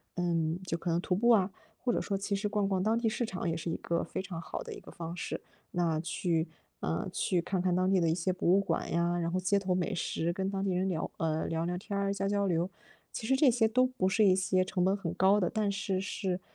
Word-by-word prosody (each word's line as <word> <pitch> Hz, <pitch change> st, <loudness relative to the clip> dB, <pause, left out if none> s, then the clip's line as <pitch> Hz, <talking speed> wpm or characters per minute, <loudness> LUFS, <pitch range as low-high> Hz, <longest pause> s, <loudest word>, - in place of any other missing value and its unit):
嗯， 170 Hz, -1 st, 0 dB
就 170 Hz, -, -1 dB
可 170 Hz, -, -4 dB
能 170 Hz, -, +2 dB
徒 180 Hz, -, 0 dB
步 235 Hz, +6 st, +3 dB
啊， 205 Hz, -4 st, +5 dB, 0.3 s
或 245 Hz, -2 st, 0 dB
者 -, -, +1 dB
说 200 Hz, -2 st, -1 dB
其 200 Hz, +1 st, -1 dB
实 205 Hz, +1 st, -1 dB
逛 205 Hz, -1 st, +1 dB
逛 190 Hz, -2 st, 0 dB
当 220 Hz, +3 st, +2 dB
地 235 Hz, -, +1 dB
市 235 Hz, +2 st, 0 dB
场 180 Hz, -5 st, -3 dB
也 165 Hz, -, 0 dB
是 170 Hz, +1 st, -4 dB
一 165 Hz, -, -1 dB
个 170 Hz, 0 st, -1 dB
非 -, -, -4 dB
常 180 Hz, -3 st, -6 dB
好 -, -, -5 dB
的 -, -, -7 dB
一 -, -, -8 dB
个 -, -, -12 dB
方 170 Hz, 0 st, -6 dB
式。 -, -, -4 dB, 0.3 s
那 170 Hz, -3 st, +1 dB
去， 165 Hz, 0 st, -1 dB, 0.3 s
呃， -, -, -1 dB
去 180 Hz, -3 st, +1 dB
看 185 Hz, +1 st, -1 dB
看 180 Hz, -1 st, +1 dB
当 185 Hz, +1 st, +2 dB
地 190 Hz, -2 st, +3 dB
的 165 Hz, -, +3 dB
一 -, -, +3 dB
些 180 Hz, +2 st, 0 dB
博 180 Hz, -1 st, 0 dB
物 190 Hz, +2 st, +6 dB
馆 200 Hz, -, -1 dB
呀， 170 Hz, +1 st, +1 dB
然 170 Hz, 0 st, -1 dB
后 185 Hz, -, +1 dB
街 185 Hz, +2 st, +2 dB
头 190 Hz, -2 st, 0 dB
美 180 Hz, -1 st, 0 dB
食 170 Hz, 0 st, -1 dB
跟 190 Hz, +2 st, -1 dB
当 195 Hz, -1 st, -2 dB
地 195 Hz, -, 0 dB
人 185 Hz, +2 st, +1 dB
聊 165 Hz, -3 st, -2 dB
呃， 160 Hz, -1 st, 0 dB
聊 165 Hz, 0 st, -1 dB
聊 175 Hz, +1 st, -1 dB
天 200 Hz, +2 st, -4 dB
儿、 200 Hz, 0 st, +1 dB
交 195 Hz, 0 st, -1 dB
交 200 Hz, 0 st, +1 dB
流。 175 Hz, -1 st, +1 dB, 0.4 s
其 220 Hz, -, -5 dB
实 265 Hz, +3 st, +3 dB
这 280 Hz, -2 st, +6 dB
些 235 Hz, -1 st, +3 dB
都 255 Hz, +4 st, +4 dB
不 255 Hz, -8 st, 0 dB
是 215 Hz, +2 st, +4 dB
一 185 Hz, -2 st, +6 dB
些 185 Hz, 0 st, +2 dB
成 185 Hz, -1 st, 0 dB
本 190 Hz, +2 st, +3 dB
很 170 Hz, -4 st, -3 dB
高 190 Hz, +3 st, +4 dB
的， 180 Hz, -4 st, +1 dB
但 210 Hz, -2 st, 0 dB
是 195 Hz, -1 st, -1 dB
是， 190 Hz, -2 st, -2 dB
185 Hz, 295 characters per minute, -31 LUFS, 175-200 Hz, 0.4 s, 物